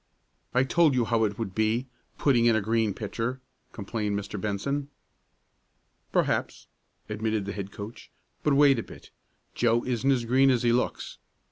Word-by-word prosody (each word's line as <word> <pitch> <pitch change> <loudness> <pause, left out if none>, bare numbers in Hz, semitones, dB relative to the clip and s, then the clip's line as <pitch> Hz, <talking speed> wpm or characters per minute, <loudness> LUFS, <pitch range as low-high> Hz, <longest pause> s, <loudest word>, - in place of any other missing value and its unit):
"I 125 - +5
told 155 +1 +3
you 120 -2 +2
how 115 -1 +2
it 105 -1 -3
would 110 -5 -4
be 110 +4 +1 0.3
putting 120 -5 +3
in 115 - +4
a - - +3
green 110 -1 0
pitcher," 115 +4 -3 0.3
complained 105 0 -3
Mr. 100 0 -6
Benson. 140 +8 -2 1.2
"Perhaps," - - 0 0.4
admitted 110 -1 -2
the 100 - -4
head 100 -1 -6
coach. 105 +3 -9 0.3
"But 145 - +2
wait 140 -3 +5
a - - -1
bit. - - -14 0.4
Joe 120 0 +2
isn't 125 +2 +1
as 125 -3 +1
green 130 +3 +4
as 125 -2 +2
he 120 - +3
looks. 125 +2 -2
115 Hz, 160 wpm, -27 LUFS, 105-130 Hz, 1.2 s, I